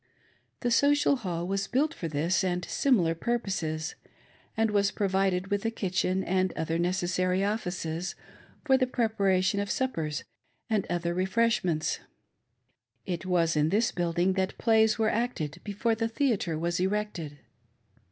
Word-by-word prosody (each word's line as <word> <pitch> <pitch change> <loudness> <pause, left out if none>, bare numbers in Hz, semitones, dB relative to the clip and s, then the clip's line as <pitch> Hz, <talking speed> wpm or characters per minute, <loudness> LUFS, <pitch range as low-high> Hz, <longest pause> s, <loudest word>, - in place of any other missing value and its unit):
The 245 - 0
Social 285 +3 +4
Hall 175 -6 -3
was 195 +1 -1
built 300 +5 +1
"for 170 - -5
this 160 +6 +1
and 180 -1 -1
similar 195 -12 +2
..purposes, 165 -6 -2 0.6
and 225 -1 +2
was 200 -1 +3
provided 195 -1 0
with 205 -1 0
a 225 - +1
kitchen 190 -3 -1
and 185 0 +1
other 165 +1 -2
neces 175 0 0
sary 185 +1 +1
offices, 180 -5 -2 0.5
for 265 -2 +5
the 255 - +2
preparation 200 -5 +1
of 200 -1 -2
suppers 165 - -1 0.5
and 210 -3 +1
other 175 0 -1
refresh 220 +6 +1
ments. 160 -4 0 1.1
It 180 0 -4
was 170 -3 +2
in 150 +1 +3
this 215 +6 +2
building 175 +1 +1
that 190 0 -1
plays 220 -1 +3
were 220 -1 +2
acted 175 -9 -2
before 210 +3 0
the 225 0 0
theatre 225 - 0
was 170 +2 -1
erected. 190 -6 -2
190 Hz, 145 wpm, -28 LUFS, 175-220 Hz, 1.1 s, for